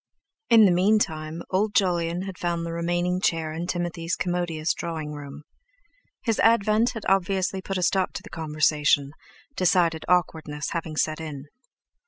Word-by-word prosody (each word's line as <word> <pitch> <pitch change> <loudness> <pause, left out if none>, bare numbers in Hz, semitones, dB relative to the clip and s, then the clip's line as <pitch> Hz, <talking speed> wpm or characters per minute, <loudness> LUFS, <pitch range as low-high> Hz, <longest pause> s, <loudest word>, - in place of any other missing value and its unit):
In 225 -2 +8
the 190 - +5
meantime 170 -4 +1
old 205 +3 0
Jolyon 175 -2 +1
had 195 -1 -6
found 170 -1 -1
the 165 - -4
remaining 175 +2 -1
chair 160 -4 0
in 170 +2 -4
Timothy's 175 -1 -2
commodious 175 -3 -1
drawing 160 -3 -5
room. 145 0 -9 0.8
His 225 -3 0
advent 225 +1 +3
had 225 -3 -7
obviously 190 0 +1
put 195 0 -3
a 180 - -1
stop 185 +3 +1
to 185 - -6
the 210 - -11
conversation, 150 -3 +1 0.4
decided 170 -3 +2
awkwardness 160 -4 0
having 165 -3 -4
set 155 0 0
in. 145 -3 -7
175 Hz, 150 wpm, -25 LUFS, 155-185 Hz, 0.8 s, In